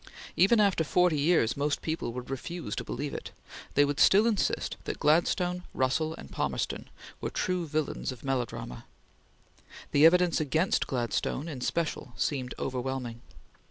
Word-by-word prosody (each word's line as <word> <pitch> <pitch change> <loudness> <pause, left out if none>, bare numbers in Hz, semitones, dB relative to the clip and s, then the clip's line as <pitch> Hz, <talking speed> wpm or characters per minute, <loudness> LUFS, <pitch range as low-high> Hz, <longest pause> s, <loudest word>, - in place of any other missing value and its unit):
Even 200 +6 +5
after 200 -5 +3
forty 175 0 +2
years, 140 -7 +3
most 145 +1 -1
people 160 -6 -2
would 125 +2 -7
refuse 165 +6 -4
to - - -3
believe 145 0 -4
it; - - -6 0.5
they 145 - +6
would 145 0 -2
still 205 +3 +6
insist 220 -4 0
that - - -3
Gladstone, 175 +3 +2
Russell, 155 +5 +1
and - - -11
Palmerston - - -2 0.3
were - - -2
true 180 -2 -1
villains 155 -2 -2
of 125 - -11
melodrama. 125 - -3 1.1
The 145 +3 +7
evidence 180 0 +3
against 160 +5 +1
Gladstone 125 +4 -1
in 140 -6 -6
special 150 -3 -2
seemed 130 -4 -1
overwhelming. 125 -2 -3
150 Hz, 145 wpm, -29 LUFS, 130-175 Hz, 1.1 s, The